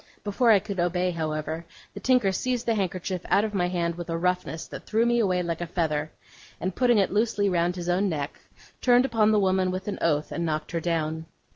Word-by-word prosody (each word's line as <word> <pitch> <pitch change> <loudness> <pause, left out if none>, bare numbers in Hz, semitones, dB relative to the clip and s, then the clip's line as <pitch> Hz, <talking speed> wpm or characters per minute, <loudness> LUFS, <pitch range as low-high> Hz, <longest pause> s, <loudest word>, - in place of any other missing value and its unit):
Before 215 +4 +1
I 215 - +8
could 200 -1 -4
obey, 180 +1 +1
however, 160 0 -3 0.3
the 200 - -7
tinker 245 -2 +3
seized 245 +5 -1
the 230 - +2
handkerchief 185 -2 -2
out 200 - +4
of 215 - -5
my 180 -3 +1
hand 170 -1 -1
with 175 0 -7
a 165 - -1
roughness 180 -2 -1
that - - -9
threw 225 +2 +2
me 240 0 +2
away 185 -5 +1
like 170 0 -3
a 175 - -3
feather, 155 -3 -1 0.5
and 185 0 -3
putting 245 -2 +3
it 195 - +2
loosely 205 -2 +1
round 175 -1 +1
his 175 -1 -5
own 185 +3 +2
neck, 145 -3 -4 0.4
turned 245 0 +5
upon 225 -4 +3
the 215 - +4
woman 190 -1 +2
with 185 +2 -4
an 205 - -3
oath, 150 -2 +1
and 170 - -2
knocked 155 -2 -2
her 170 - -1
down. 160 -1 -2
180 Hz, 225 wpm, -26 LUFS, 170-205 Hz, 0.5 s, I